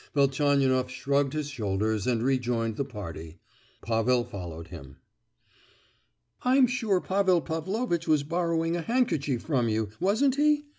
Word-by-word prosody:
Velchaninoff 135 -2 +2
shrugged 140 +1 0
his 150 -1 -3
shoulders 105 -2 -1
and 120 -2 +1
re 135 0 +2
joined 115 -2 -1
the 140 - -1
party. 85 - -8 0.5
Pavel 120 +2 +1
followed 85 -6 -8
him. 70 -7 -11 1.4
"I'm 260 +1 +4
sure 230 -6 0
Pavel 190 -1 +2
Pavlovitch 170 +3 -2
was 155 -2 +3
borrowing 165 +1 0
a 175 - -2
handkerchief 160 - 0
from 130 -7 0
you, 110 -1 -1
wasn't 255 +8 +2
he? 295 0 +3
140 Hz, 135 wpm, -27 LUFS, 115-175 Hz, 1.4 s, I'm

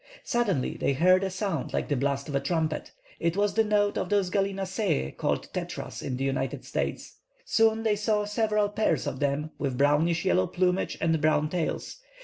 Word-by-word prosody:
Suddenly 205 - 0
they 140 - +1
heard 185 +6 +4
a 195 - 0
sound 190 -6 -3
like - - -1
the 145 - 0
blast 140 +1 -1
of 145 - -5
a 140 - +2
trumpet. 160 -1 -1 0.3
It 170 +2 0
was 205 0 +2
the 225 +2 +3
note 205 -1 +1
of - - -3
those 200 -3 +1
gallinaceæ, 195 - -1
called - - -2
"tetras" - - -5
in 125 - -3
the 135 - -2
United 135 0 -2
States. - - -4 0.3
Soon 225 0 +3
they 215 -2 +2
saw 210 0 0
several 210 -1 +1
pairs 205 -9 0
of 130 - -3
them, 145 +2 -1
with 135 -3 -2
brownish 150 +5 +2
yellow 95 - +3
plumage 180 +1 0
and 160 -2 +1
brown 155 -1 +2
tails. 175 -3 -2
180 Hz, 185 wpm, -27 LUFS, 145-205 Hz, 0.3 s, heard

